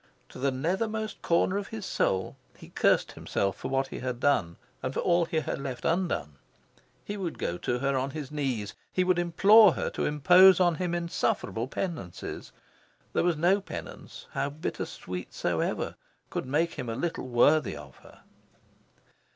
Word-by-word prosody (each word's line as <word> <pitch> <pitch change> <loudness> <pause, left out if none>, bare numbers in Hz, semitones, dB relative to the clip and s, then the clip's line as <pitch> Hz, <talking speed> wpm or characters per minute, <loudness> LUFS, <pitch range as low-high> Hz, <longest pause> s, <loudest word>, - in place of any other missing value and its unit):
To - - -11
the 135 +1 +1
nethermost 210 - -2
corner 180 +3 +2
of 200 - -6
his 220 -3 -6
soul, 95 - 0 0.2
he - - -13
cursed - - +2
himself 100 -1 -2
for - - -6
what 135 0 0
he - - -6
had 125 -1 -4
done, 105 -12 +1 0.3
and 130 +1 -4
for - - 0
all 175 -1 +3
he 160 -1 -1
had 140 - -4
left 130 -3 -5
undone. 160 - -1 0.7
He 205 - -4
would 180 -5 -4
go 85 +1 -3
to 125 - -1
her 140 +2 0
on 130 +1 0
his 150 -1 -6
knees. 130 -9 -2 0.2
He 185 - +1
would 180 -1 +2
implore 195 +4 +6
her - - -3
to - - -2
impose 180 +6 +6
on 175 -2 +4
him 175 +1 -2
insufferable 170 -8 -1
penances. 145 - -5 0.6
There - - +2
was 175 -3 +1
no 180 +5 +3
penance, 195 - -9
how 140 - -1
bittersweet 90 - -6
soever, - - -1 0.4
could - - -3
make 160 +5 +1
him 125 - -5
a 115 - -3
little 165 -2 -3
worthy 135 +6 +3
of 70 -3 -12
her. - - -18
155 Hz, 170 wpm, -28 LUFS, 130-180 Hz, 0.7 s, implore